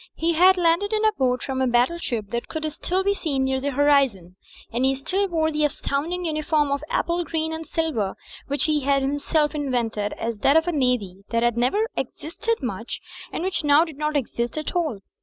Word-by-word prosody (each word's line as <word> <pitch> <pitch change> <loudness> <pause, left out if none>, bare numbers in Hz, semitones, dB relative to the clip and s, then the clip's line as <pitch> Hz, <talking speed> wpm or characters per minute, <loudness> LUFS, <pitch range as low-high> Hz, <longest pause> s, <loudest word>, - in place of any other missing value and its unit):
He 335 +1 +1
had 370 +3 +6
landed 350 +4 +2
in 435 0 +1
a 435 - +5
boat 250 - 0
from 265 -1 -2
a 260 - +2
battleship 240 - 0
that 235 0 -3
could 315 -1 -3
still 365 +5 -1
be 400 +1 +2
seen 290 -9 -1
near 265 0 0
the 285 - -1
horizon, 270 -11 +2 0.4
and 240 +2 0
he 265 +1 +3
still 380 +9 0
wore 320 -3 0
the 305 0 0
astounding 305 +4 -1
uniform 310 -2 +1
of 280 +1 -1
apple 345 +1 0
green 320 -1 -2
and 320 -1 -6
silver 305 -13 -1 0.3
which 285 +1 0
he 305 -1 +2
had 275 0 +1
himself 290 +2 +1
invented 240 -8 -1
as 230 -1 -4
that 275 +8 +4
of 320 +2 +2
a - - +2
navy 250 - 0
that 230 0 +1
had 240 -1 +2
never 260 - +1
existed 455 +8 -3
very 255 - -1
much, 225 +2 -5 0.3
and - - -3
which 375 -3 -1
now 295 +2 +5
did 310 -4 -11
not 300 0 -1
exist 240 -1 -2 0.2
«all. 315 - -1
290 Hz, 205 wpm, -24 LUFS, 250-330 Hz, 0.4 s, had